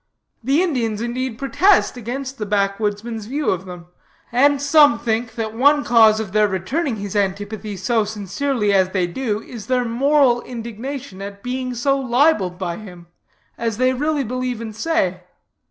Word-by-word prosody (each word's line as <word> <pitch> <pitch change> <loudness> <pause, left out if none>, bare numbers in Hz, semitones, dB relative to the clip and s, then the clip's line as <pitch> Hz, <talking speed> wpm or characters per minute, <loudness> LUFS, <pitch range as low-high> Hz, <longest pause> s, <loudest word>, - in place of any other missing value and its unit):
The 275 +8 +2
Indians, 235 - -1
in 235 +1 -3
deed, 255 -2 -3
protest 360 - +3
against 260 +3 -5
the 210 - -2
backwoodsman's 205 +2 -1
view 285 +4 0
of 185 0 -3
them; 180 -1 -9 0.5
and 280 +4 +4
some 285 -3 +5
think 225 0 -2
that 220 -2 -3
one 285 +5 +4
cause 220 -2 +5
of 215 -3 -4
their 210 +1 +3
returning 230 - -2
his 205 -1 -6
antipathy 205 +1 -2
so 225 +4 +1
sincerely 210 +2 -1
as 190 -1 +3
they 185 -3 +1
do, 215 +3 -3
is 230 -5 -9
their 250 -1 +1
moral 255 +1 +3
indignation 235 -1 -7
at 200 0 -8
being 255 0 -3
so 275 +3 +1
libeled 245 - +2
by 175 -2 -3
him, 180 -5 -12 0.5
as 230 -2 -2
they 255 +1 +2
really 295 +2 0
believe 255 0 -3
and 220 -2 -7
say. 210 - 0
230 Hz, 165 wpm, -20 LUFS, 205-265 Hz, 0.5 s, some